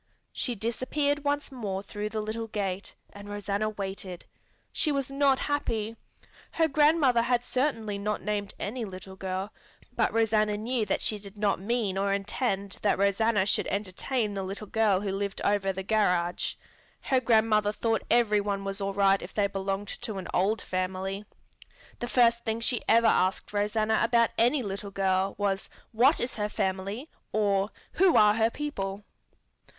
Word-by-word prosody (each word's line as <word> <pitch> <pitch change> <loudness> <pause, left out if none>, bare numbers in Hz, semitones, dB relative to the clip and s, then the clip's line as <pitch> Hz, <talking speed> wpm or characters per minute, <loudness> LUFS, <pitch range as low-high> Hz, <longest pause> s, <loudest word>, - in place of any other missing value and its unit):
She 245 - -2
disappeared 280 +7 -1
once 290 0 -1
more 200 -7 -4
through 210 +1 -4
the 215 0 -3
little 225 +1 -4
gate, 200 -3 -3 0.2
and 205 0 -10
Rosanna 205 +1 -1
waited. 195 -3 -5 0.5
She 305 - +1
was 275 -1 -1
not 275 -1 +3
happy. 230 -7 -2 0.6
Her 325 -1 +3
grandmother 295 -4 +4
had 240 +1 +1
certainly 225 -7 -1
not 210 +1 -2
named 205 -1 -2
any 235 +4 -3
little 190 -2 -8
girl, 190 +2 -4 0.4
but - - +2
Rosanna 215 -2 +2
knew 225 0 -1
that - - 0
she 215 - 0
did 200 0 -11
not 205 -1 +1
mean 205 -2 -1
or 200 0 +1
intend 200 0 -2
that 205 - +2
Rosanna 200 +1 +2
should 205 - +1
entertain 210 +3 -2
the 195 - -3
little 195 +3 -5
girl 210 -2 +2
who 200 -2 -2
lived 200 0 -3
over 200 -1 +2
the 190 0 -5
garage. 180 -4 +1 0.5
Her 265 - +2
grandmother 220 -3 +3
thought 225 +1 0
every 220 -3 +4
one 200 -1 -2
was 195 +1 -4
all 195 0 -2
right 195 -1 +4
if - - -9
they 205 - +3
belonged 195 0 -3
to 220 -4 -5
an 190 - -5
old 200 +3 +1
family. 190 +2 -3 0.7
The 240 - -3
first 235 -1 +3
thing 225 0 -1
she 235 0 +1
ever 230 +1 +5
asked 185 -1 +2
Rosanna 215 +1 +1
about 235 0 +3
any 250 +3 +3
little 200 0 -5
girl 195 0 0
was 195 -1 -1 0.2
"What 255 +7 +4
is 245 - -1
her 210 -1 -2
family?" 195 +7 -2 0.2
or 200 -1 +1 0.2
"Who 370 -1 +4
are 210 -1 +7
her 225 +1 +2
people?" 205 -9 -4
210 Hz, 165 wpm, -28 LUFS, 195-230 Hz, 0.7 s, are